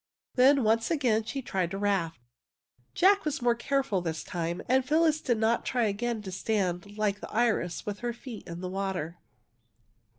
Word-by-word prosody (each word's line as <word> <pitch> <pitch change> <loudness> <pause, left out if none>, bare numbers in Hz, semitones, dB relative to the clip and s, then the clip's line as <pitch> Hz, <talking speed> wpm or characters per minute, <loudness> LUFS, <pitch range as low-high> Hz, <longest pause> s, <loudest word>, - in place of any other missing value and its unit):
Then 265 +1 +5
once 225 +1 +2
again 245 -9 +1
she 270 +3 -4
tried 185 -6 -1
the 195 - -4
raft. 195 -8 0 0.8
Jack 395 +3 +5
was 305 0 -2
more 240 -1 +3
careful 240 -5 0
this 160 -2 -3
time, 170 0 -3
and 260 +1 +3
Phyllis 310 +2 +2
did 240 -3 +1
not 225 +2 +1
try 245 -2 0
again 220 +2 -2
to 190 - -6
stand 195 0 -2
like 205 -1 0
the - - -8
iris 220 -7 0
with 205 -1 -4
her 240 0 -2
feet 235 -1 -9
in 170 +1 -7
the 185 - -3
water. 185 -3 -3
220 Hz, 175 wpm, -29 LUFS, 190-250 Hz, 0.8 s, Then